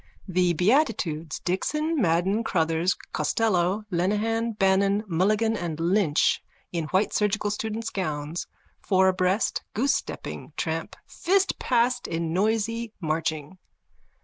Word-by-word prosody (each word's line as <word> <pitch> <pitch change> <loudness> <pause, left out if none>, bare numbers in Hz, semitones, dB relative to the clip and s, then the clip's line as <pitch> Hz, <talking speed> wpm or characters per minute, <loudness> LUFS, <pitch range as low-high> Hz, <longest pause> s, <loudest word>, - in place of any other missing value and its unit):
_(The 180 -2 +1
beatitudes, 180 - +1
Dixon, 300 - -1
Madden, 185 +5 +2
Crotthers, 165 -2 +1 0.2
Costello, 185 +4 +1
Lenehan, 215 +6 0
Bannon, 195 0 +2
Mulligan 210 +5 +1
and 170 -6 -4
Lynch 170 -2 +2 0.3
in 170 -2 -2
white 190 +6 +1
surgical 210 0 +1
students' 220 +2 -3
gowns, 155 -3 -3 0.3
four 190 -1 +3
abreast, 185 +3 +1
goosestepping, 265 +7 -2
tramp - - -3
fast 385 +2 0
past 245 0 +1
in 165 0 -2
noisy 225 +3 0
marching.) 160 0 -2
190 Hz, 105 wpm, -26 LUFS, 170-220 Hz, 0.3 s, four